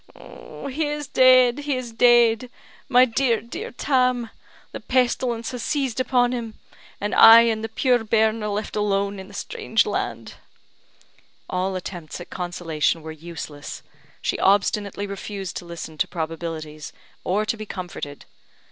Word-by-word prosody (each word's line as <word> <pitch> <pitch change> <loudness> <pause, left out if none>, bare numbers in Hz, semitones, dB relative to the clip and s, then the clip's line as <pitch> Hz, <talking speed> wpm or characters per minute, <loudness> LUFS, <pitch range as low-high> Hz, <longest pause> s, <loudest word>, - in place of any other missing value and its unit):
"He 295 +3 -6
is 295 0 -3
dead! 255 -1 +5
he 290 -1 -1
is 245 -2 -6
dead! 240 0 +4 0.4
My 250 -1 +6
dear, 235 -1 +1
dear 235 +2 -7
Tam! 250 -3 0 0.4
The - - -6
pestilence 245 -2 0
has 250 -2 -5
seized 265 -2 -1
upon 245 -1 +2
him; 230 -3 -4 0.4
and 205 +1 -2
I 225 +1 +10
and 225 -2 0
the 225 - -3
puir 245 +1 +2
bairn 220 0 +2
are 210 - -2
left 210 +1 -3
alone 200 -1 0
in 190 - -9
the 205 - -13
strange 440 - 0
land." - - -4 1.1
All 185 +1 -2
attempts 175 -4 -6
at 175 - -11
consolation 170 -3 -1
were 160 - -6
useless; 155 -2 -8 0.4
she - - -1
obstinately 200 0 +1
refused 195 -1 -6
to - - -7
listen 165 -2 -8
to - - +2
probabilities, 160 -2 -5 0.3
or 205 +4 0
to 225 +2 -1
be 215 -1 -8
comforted. 175 -7 -7
220 Hz, 145 wpm, -23 LUFS, 185-245 Hz, 1.1 s, I